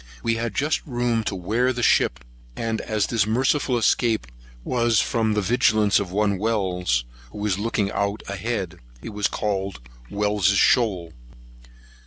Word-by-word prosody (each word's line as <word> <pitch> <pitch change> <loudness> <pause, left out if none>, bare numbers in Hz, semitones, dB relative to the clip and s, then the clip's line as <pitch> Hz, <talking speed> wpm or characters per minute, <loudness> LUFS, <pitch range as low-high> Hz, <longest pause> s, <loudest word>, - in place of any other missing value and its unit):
We 115 - +1
had 115 0 -3
just 150 +3 0
room 120 -3 0
to 100 - -2
wear 110 +8 0
ship; 120 - +2 0.3
and 115 - -2
as 110 -2 -1
this 110 -4 0
merciful 130 +3 +1
escape 115 - +1 0.4
was 120 - +2
from 110 0 0
the 105 - 0
vigilance 110 -2 +3
of 95 -3 -4
one 100 -1 +1
Wells, 90 - 0 0.3
who - - -10
was 105 -2 -1
looking 105 -2 -1
out 100 +1 -2
ahead, 100 -3 -4 0.2
it - - -6
was 105 -1 0
called 100 -4 -3 0.3
Wells's 105 -1 +1
Shoals. 95 -8 +2
105 Hz, 145 wpm, -23 LUFS, 100-115 Hz, 0.4 s, vigilance